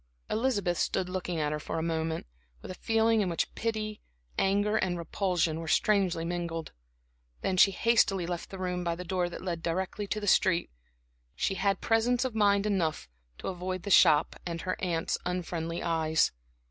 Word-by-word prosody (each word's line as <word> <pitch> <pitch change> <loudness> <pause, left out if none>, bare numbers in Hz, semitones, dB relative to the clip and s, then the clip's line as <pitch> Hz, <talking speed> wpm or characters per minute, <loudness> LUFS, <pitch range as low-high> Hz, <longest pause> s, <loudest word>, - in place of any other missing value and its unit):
Elizabeth 205 -7 0
stood 180 - 0
looking 180 -2 -3
at 150 -1 0
her 150 - -2
for 165 - -4
a 160 - -1
moment, 160 -1 -2 0.4
with - - -6
a 185 - -11
feeling 225 0 +3
in 190 - 0
which 170 - -1
pity, 215 -2 -3 0.3
anger 205 +2 +2
and 185 -4 0
repulsion 170 -1 0
were 165 - -6
strangely 185 -3 +2
mingled; 170 -2 -3 0.7
then 190 - 0
she 185 - +7
hastily 195 -3 +2
left 175 0 -4
the 195 - -8
room 180 -1 -2
by 170 -1 -1
the 180 - -6
door 180 0 -1
that 175 - -8
led 170 -3 -3
directly 190 +4 -2
to 215 - -2
the 210 - -5
street. 180 -3 +3 0.6
She - - 0
had 195 0 0
presence 235 +3 +2
of 255 - -2
mind 200 -2 +3
enough 180 -7 0 0.3
to - - -7
avoid 185 -1 -4
the 200 - -4
shop 150 -4 +6
and 170 -1 -4
her 185 0 -2
aunt's 170 -3 -1
unfriendly 170 -2 -3
eyes. 160 -1 +2
180 Hz, 180 wpm, -29 LUFS, 170-200 Hz, 0.7 s, she